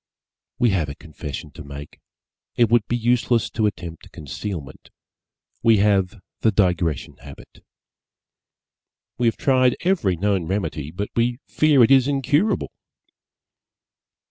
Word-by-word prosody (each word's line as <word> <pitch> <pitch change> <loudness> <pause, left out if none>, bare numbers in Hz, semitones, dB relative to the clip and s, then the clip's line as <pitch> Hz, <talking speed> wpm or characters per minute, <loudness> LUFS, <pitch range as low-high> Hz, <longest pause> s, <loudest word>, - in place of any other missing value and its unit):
We 120 -3 +3
have 85 -7 0
a 70 - -7
confession 75 -2 -8
to - - -10
make 70 0 -10 0.6
it 120 -2 +3
would 115 -3 +3
be 120 - 0
useless 120 0 +1
to 110 -2 +1
attempt 85 -5 -7
concealment 75 +1 -7 0.7
we 115 -1 +5
have 100 0 +2 0.2
the 110 - +3
Digression 90 - 0
habit. 70 +2 -14 1.6
We 120 - +2
have 115 - 0
tried 130 -2 +3
every 175 - +1
known 95 -1 0
remedy 80 -6 -3
but 95 +6 -5
we 120 +1 +1
fear 150 -5 +4
it 115 - +4
is 135 -1 +5
incurable. 145 - +1
105 Hz, 125 wpm, -22 LUFS, 85-120 Hz, 1.6 s, we